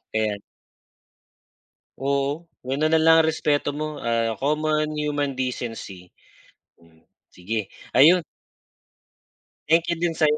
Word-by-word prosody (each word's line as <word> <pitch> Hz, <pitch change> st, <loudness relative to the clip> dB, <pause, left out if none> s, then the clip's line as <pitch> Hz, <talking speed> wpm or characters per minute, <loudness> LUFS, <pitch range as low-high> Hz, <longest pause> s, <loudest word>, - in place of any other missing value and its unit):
Ayan 105 Hz, -2 st, 0 dB, 1.6 s
Oo, 140 Hz, +4 st, -1 dB, 0.2 s
gano'n 150 Hz, +4 st, 0 dB
na 160 Hz, -, +5 dB
lang 160 Hz, 0 st, +6 dB
ang -, -, +1 dB
respeto 145 Hz, -2 st, 0 dB
mo. 155 Hz, 0 st, -4 dB
Ah, 115 Hz, -1 st, -1 dB
common 155 Hz, +1 st, 0 dB
human 145 Hz, -2 st, -1 dB
decency. 115 Hz, -8 st, -5 dB, 0.7 s
Hmm, 80 Hz, -1 st, -25 dB, 0.2 s
sige, 100 Hz, +3 st, -4 dB, 0.2 s
ayun. 165 Hz, +7 st, +6 dB, 1.4 s
Thank 165 Hz, +2 st, +3 dB
you 170 Hz, -, -1 dB
din 170 Hz, -1 st, 0 dB
sa'yo, 150 Hz, -1 st, +2 dB
145 Hz, 110 wpm, -23 LUFS, 115-155 Hz, 1.6 s, lang